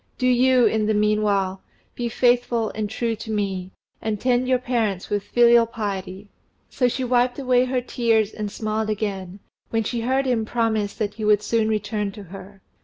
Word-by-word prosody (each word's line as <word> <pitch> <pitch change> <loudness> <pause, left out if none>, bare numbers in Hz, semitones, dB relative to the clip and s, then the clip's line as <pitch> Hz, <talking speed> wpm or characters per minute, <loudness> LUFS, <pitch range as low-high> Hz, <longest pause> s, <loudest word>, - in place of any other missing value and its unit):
Do 255 - -1
you, 255 0 +4
in 215 -1 +1
the 215 - +1
meanwhile, 205 -2 +1 0.3
be 240 -1 -3
faithful 240 -1 +1
and 215 -1 -3
true 230 +2 -2
to 220 - -9
me, 195 -4 -2 0.3
and 220 -2 -2
tend 250 +1 +1
your 255 0 +3
parents 230 -7 -2
with 205 -1 +1
filial 235 +2 +4
piety." 200 -3 -5 0.4
So 250 - +2
she 260 +2 -2
wiped 245 0 +1
away 255 -2 +2
her 255 0 -1
tears 225 -4 +1
and 210 -1 -4
smiled 215 0 -2
again, 200 -3 -4 0.3
when 225 -1 0
she 235 +2 -3
heard 265 +3 +1
him 245 -4 +1
promise 220 -3 -1
that 210 -2 -2
he 215 +1 -7
would 210 0 +3
soon 220 0 +1
return 210 -1 -2
to 205 - -9
her. 195 +1 -12
220 Hz, 180 wpm, -23 LUFS, 205-245 Hz, 0.4 s, you